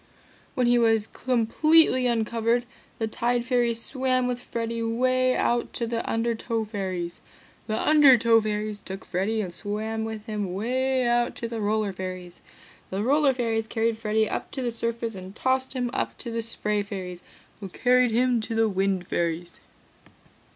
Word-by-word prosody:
"When 255 - +2
he 240 0 +4
was 225 -2 +3
completely 255 +4 +3
uncovered, 230 +1 +1 0.3
the 225 - -1
Tide 240 +2 -1
Fairies 240 -2 +1
swam 255 -1 0
with 250 -1 -2
Freddy 230 -1 -4
'way 255 +3 +2
out 240 0 0
to 235 - -1
the 230 0 -2
Undertow 230 0 -1
Fairies. 185 -5 -4 0.5
The 215 -1 -1
Undertow 250 -7 +6
Fairies 210 -1 -3
took 190 -1 -8
Freddy 205 +5 -1
and 180 -4 -5
swam 215 +4 -3
with 220 -1 -5
him 205 -5 -3
'way 255 +4 0
out 240 0 +1
to 230 - -4
the 230 -1 -4
Roller 210 -1 0
Fairies. 185 -1 -7 0.5
The 195 +2 -2
Roller 285 +3 +4
Fairies 225 -3 -1
carried 225 0 0
Freddy 220 0 0
up - - -4
to 265 - -3
the 240 - -1
surface 230 0 -3
and 190 0 -9
tossed 260 +1 0
him 245 -2 -2
up - - -2
to 235 - -5
the 230 0 -1
Spray 210 -2 -1
Fairies 185 -3 -6 0.4
who 195 -2 -7
carried 250 +5 +3
him 240 +1 +2
to 225 +1 -4
the 225 0 +3
Wind 195 -2 0
Fairies." 170 0 -2
225 Hz, 165 wpm, -26 LUFS, 210-245 Hz, 0.5 s, Undertow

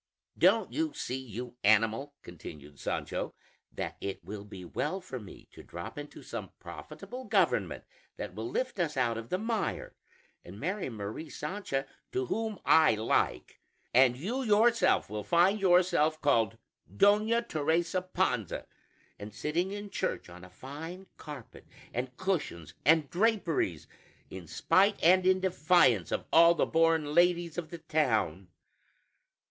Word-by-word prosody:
"Don't - - +3
you 315 -1 -1
see, 125 - -3
you 125 0 -8
animal," 115 +7 +3
continued 75 -4 -11
Sancho, - - -3 0.4
"that - - -5
it 100 -3 -5
will 100 +3 -7
be 100 -3 -10
well 190 - -2
for 135 -9 -7
me 105 -4 -13
to - - -12
drop 85 0 -8
into 145 0 -9
some - - -6
profitable 255 +1 -9
government - - +1 0.3
that - - -6
will 350 - -5
lift 455 - -2
us 155 -5 -1
out 120 -3 +1
of 115 +1 -7
the 185 - 0
mire, 220 +1 -2 0.5
and 95 +4 -11
marry 185 +1 -2
Mari 110 +7 -6
Sancha 150 -5 -3 0.3
to 130 - 0
whom 220 - -2
I 160 -7 +6
like; 110 +1 0 0.3
and 125 0 +5
you 225 - -2
yourself 230 0 +3
will 105 +1 -5
find 185 +5 +3
yourself 175 -4 +3
called 115 -8 +2 0.3
'Doña 215 - +3
Teresa 165 +3 0
Panza,' 180 - -1 0.5
and 105 +1 -7
sitting 160 +9 -1
in 205 0 -6
church 185 - -3
on 90 0 -12
a 90 - -11
fine 155 - -8
carpet 145 -7 -10 0.3
and 125 +1 -4
cushions 150 - -2
and 155 0 +5
draperies, 175 - +1 0.5
in 90 -3 -8
spite 190 - +3
and 185 +2 +5
in 185 0 +4
defiance 155 - +3
of - - -2
all 170 +1 +7
the - - +2
born 165 -2 +2
ladies 175 0 +3
of 160 -3 -7
the 170 - -7
town? 110 - 0
155 Hz, 145 wpm, -30 LUFS, 115-185 Hz, 0.5 s, all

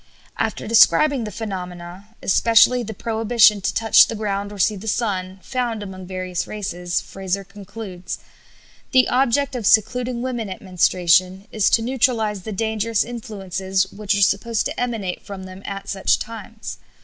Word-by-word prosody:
After - - -2
describing 260 +3 +5
the 210 - -6
phenomena 185 0 -7
(especially 230 +4 +4
the 220 -2 -6
prohibition 220 -1 +3
to - - 0
touch 225 -1 +5
the 230 - -5
ground 205 -1 -3
or 205 - -9
see 205 +2 +2
the 200 +3 -9
sun) 190 -4 -2
found 240 -4 -2
among 190 -2 -9
various 185 -1 -4
races, 180 -4 -3
Frazer 195 0 -4
concludes: 200 -1 -8 0.8
"The 255 -1 +5
object 270 +2 +2
of 230 -5 -1
secluding 245 +2 +2
women 240 -5 -3
at 185 - -6
menstruation 185 +1 +2
is 215 -2 +2
to 225 - +3
neutralize 230 -5 0
the 215 - -7
dangerous 220 +1 0
influences 195 -5 -3
which 205 0 -1
are 200 - +3
supposed 210 +4 +1
to - - -4
emanate 225 -7 -3
from 195 -2 -8
them 185 0 -10
at 195 0 -6
such 195 -1 +1
times. 225 -1 -8
210 Hz, 155 wpm, -21 LUFS, 190-230 Hz, 0.8 s, describing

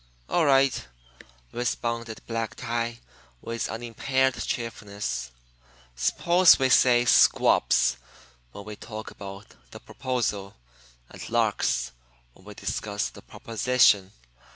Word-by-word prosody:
"All 170 -3 +2
right," 135 - +3 0.6
responded 115 -1 -3
Black 115 -1 -4
Tie, 115 0 -3 0.4
with 115 - -4
unimpaired 130 +4 0
cheerfulness; 100 - -4 0.7
"suppose 170 - +4
we 130 -2 +1
say 125 -1 +5
'squabs' - - +4 0.5
when 100 - -10
we 105 0 -7
talk 110 0 -8
about 100 +1 -10 0.2
the - - -11
'proposal' 115 -7 -3 0.6
and - - -9
'larks' - - 0 0.4
when 95 - -22
we 105 0 -11
discuss 105 +1 -3
the - - -14
'proposition.' 115 -4 +2
115 Hz, 105 wpm, -26 LUFS, 100-125 Hz, 0.7 s, say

